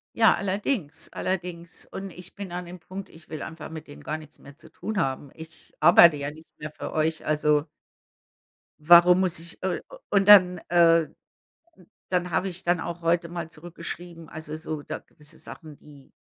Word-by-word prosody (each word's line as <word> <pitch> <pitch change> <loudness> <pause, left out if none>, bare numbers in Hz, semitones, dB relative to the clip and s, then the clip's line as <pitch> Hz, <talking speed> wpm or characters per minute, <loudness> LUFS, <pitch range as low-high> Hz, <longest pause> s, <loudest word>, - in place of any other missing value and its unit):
Ja, 225 -1 +5
allerdings, 195 - -2
allerdings. 175 -2 -4
Und 195 0 -7
ich 180 +1 -13
bin 200 -3 -7
an 180 +1 -5
dem 180 +1 -10
Punkt, 190 +3 -8
ich 160 -1 -18
will 155 -2 -6
einfach 160 -2 -7
mit 160 -1 -9
denen 145 - -12
gar 155 - -3
nichts 155 -1 -15
mehr 140 +2 -15
zu - - -15
tun 215 -2 -5
haben. 135 -1 -2
Ich 160 0 -13
arbeite 170 -1 +7
ja 145 +1 -4
nicht 160 +1 -16
mehr 155 +1 -5
für - - -7
euch, 155 0 -1
also 150 -1 +2 1.2
Warum 175 +3 +7
muss 175 -3 0
ich 165 +1 -12
äh, 185 -1 -1
u - - -9
und 195 -1 +2
dann, 180 -4 +8
äh, 165 -2 +5
d - - -24 1.0
dann 180 -1 0
habe 195 - 0
ich 185 0 -6
dann 175 0 +2
auch 170 +1 -5
heute 170 0 +1
mal 170 -2 -5
zurückgeschrieben. 170 +1 -8
Also, 155 -1 -7
so 155 -1 -5
da - - -5
gewisse 150 +2 -13
Sachen, 155 -4 -11
die 145 -3 -17
170 Hz, 190 wpm, -26 LUFS, 155-180 Hz, 1.2 s, dann